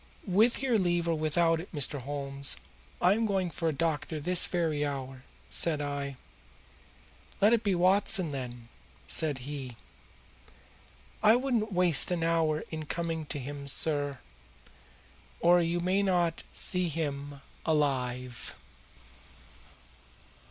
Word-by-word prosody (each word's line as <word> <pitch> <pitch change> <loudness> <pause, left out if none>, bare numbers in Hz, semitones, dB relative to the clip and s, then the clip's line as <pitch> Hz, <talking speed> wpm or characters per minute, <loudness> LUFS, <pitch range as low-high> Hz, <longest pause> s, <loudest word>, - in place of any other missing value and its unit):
'With 220 +8 +3
your 245 -5 +2
leave 175 -2 +1
or 165 - +2
without 165 +1 +2
it, 175 - -9
Mr. 145 -2 +1
Holmes, 140 0 -2 0.4
I 180 +2 +5
am 225 +1 0
going 190 -4 0
for 165 +2 -3
a - - +2
doctor 155 +1 -2
this 175 +4 +2
very 160 -4 0
hour,' 135 -2 -4 0.3
said 160 -3 +2
I. 145 -1 -3 1.2
'Let 210 +3 +5
it 230 - +3
be 200 -3 +1
Watson, 185 -1 +3
then,' 125 -4 -6 0.4
said 155 -4 0
he. 135 -4 -6 1.5
I 215 +1 +6
wouldn't 240 -4 0
waste 180 -4 +3
an 175 -2 -1
hour 165 -2 +1
in 155 -1 -5
coming 165 -2 -3
to - - -2
him, 140 +1 -6
sir, 145 -1 +1 1.2
or 175 +1 +5
you 170 +1 0
may 185 +3 +1
not 175 -4 +1
see 180 -1 +3
him 145 -2 -4 0.2
alive." 125 -5 -1
160 Hz, 125 wpm, -29 LUFS, 145-180 Hz, 1.5 s, I